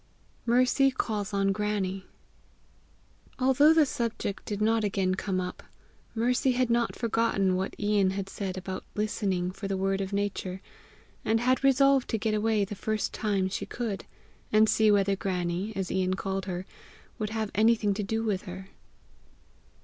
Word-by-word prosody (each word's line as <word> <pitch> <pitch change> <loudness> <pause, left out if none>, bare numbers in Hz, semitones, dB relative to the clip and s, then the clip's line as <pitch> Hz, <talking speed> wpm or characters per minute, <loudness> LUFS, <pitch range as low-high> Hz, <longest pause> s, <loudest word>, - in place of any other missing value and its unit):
MERCY 255 +3 +4
CALLS 210 -2 -2
ON 195 -1 +1
GRANNIE. 195 -2 -2 1.3
Although 265 +4 +5
the 320 -2 +5
subject 230 -6 -3
did 205 -1 -3
not 220 +1 +2
again 190 -2 +1
come 190 0 -2
up, 180 0 -5 0.5
Mercy 250 +3 +2
had 250 -1 +1
not 235 0 +1
forgotten 225 -5 +1
what 190 +1 -2
Ian 205 -2 +2
had 195 0 -3
said 195 -1 -5
about 185 0 -5
listening 195 -4 -1
for 195 +2 -6
the 195 -1 -1
word 195 +1 0
of 190 0 -4
Nature, 200 -2 -2 0.6
and 225 +1 +2
had 255 +3 +1
resolved 275 0 +4
to 225 - 0
get 215 0 -1
away 215 -1 +2
the 205 - -7
first 215 +1 -2
time 200 -3 0
she 190 - -4
could, 225 -5 -4 0.5
and 215 +1 +5
see 220 0 +4
whether 200 -1 +3
Grannie, 185 +1 -2
as 190 -1 -3
Ian 185 0 +1
had - - -3
called 195 -1 -3
her, 185 -1 -4 0.5
would 215 -1 -2
have 220 -1 -3
anything 215 -1 +3
to 205 - -3
do 220 +3 -2
with 205 -4 -1
her. 190 +1 -8
205 Hz, 165 wpm, -28 LUFS, 190-225 Hz, 1.3 s, Although